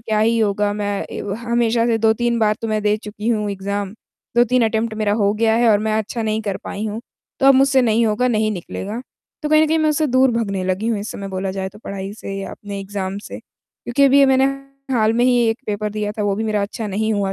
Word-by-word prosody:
क्या 220 -2 -1
ही 230 +1 +3
होगा? 205 -1 +1
मैं 205 -1 -2
ए - - -5
व 200 -1 -3
हमेशा 235 -1 +1
से 230 -1 +2
2-3 230 +2 +2
बार 215 -1 +3
तो 225 - -2
मैं 215 -1 0
दे 210 0 +2
चुकी 210 +1 -6
हूँ 210 -3 0
एग्ज़ाम। 200 0 -3 0.4
2-3 240 0 +4
अटेम्प्ट 220 0 -1
मेरा 210 -2 0
हो 205 -2 +2
गया 220 0 +2
है 235 0 +3
और 205 - +4
मैं 215 0 -1
अच्छा 225 +2 -3
नहीं 220 0 -1
कर 200 -2 -2
पाई 210 +2 -4
हूँ, 215 +1 -4 0.4
तो 270 - +4
अब 275 - +8
मुझसे 265 -1 +4
नहीं 225 0 +2
होगा, 220 +4 +1
नहीं 215 -2 +1
निकलेगा।" 200 +4 -5 0.4
तो 300 - -1
कहीं 310 0 +5
न - - +3
कहीं, 320 +1 +1
मैं 310 0 +2
उससे 305 +1 +1
दूर 260 0 +3
भागने 200 -5 -1
लगी 190 +4 -1
हूँ, 220 -3 0
इस 205 - -5
समय 200 -1 -6
बोला 190 0 -3
जाए, 190 0 -3
तो 205 +2 -15
पढ़ाई 195 0 -5
से 195 -2 -7
या 195 - -5
अपने 200 -1 -7
एग्ज़ाम 195 0 -4
से। - - -7
क्योंकि 280 +4 -3
अभी 275 +1 +5
ये 275 - +6
मैंने 265 0 +4 0.5
हाल 220 -1 +3
में 240 +1 +2
ही 250 -1 +4
एक 225 - -1
पेपर 210 0 -2
दिया 210 -1 -2
था, 210 - -4
वो 205 -1 +1
भी 220 - -2
मेरा 210 -2 0
अच्छा 215 +2 -4
नहीं 220 +2 -1
हुआ 195 -1 0
215 Hz, 255 wpm, -20 LUFS, 205-235 Hz, 0.5 s, अब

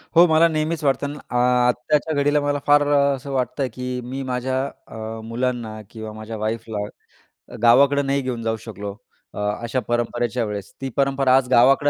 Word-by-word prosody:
हो, 170 - +9
मला 160 +1 +5
नेहमीच 155 0 -1
वाटतं 140 0 +1
ना, 145 +1 -7
अ, - - -5 0.3
आत्ताच्या 145 +6 +1
घडीला 145 +1 +3
मला 145 0 0
फार 145 0 +6
अ, 145 - +3 0.2
असं 135 +1 -8
वाटतं 130 0 -1
आहे, 130 - -1
की 125 0 -4
मी 130 +3 -5
माझ्या 130 +1 -1 0.3
अ, 110 0 -6
मुलांना 115 -2 -3
किंवा 110 -1 -7
माझ्या 110 +1 -7
वाईफला 110 0 -3 0.7
अ, - - -6
गावाकडं 140 +4 +5
नाही 140 0 +1
घेऊन 125 -3 -3
जाऊ 115 0 0
शकलो 105 -2 -6 0.4
अ, - - -7 0.2
अशा 120 +2 -1
परंपरेच्या 120 0 0
वेळेस. 105 -2 -6
ती 135 - -3
परंपरा 135 -1 +3
आज 135 -1 +1
गावाकडे 135 +4 +5
125 Hz, 180 wpm, -22 LUFS, 115-140 Hz, 0.7 s, हो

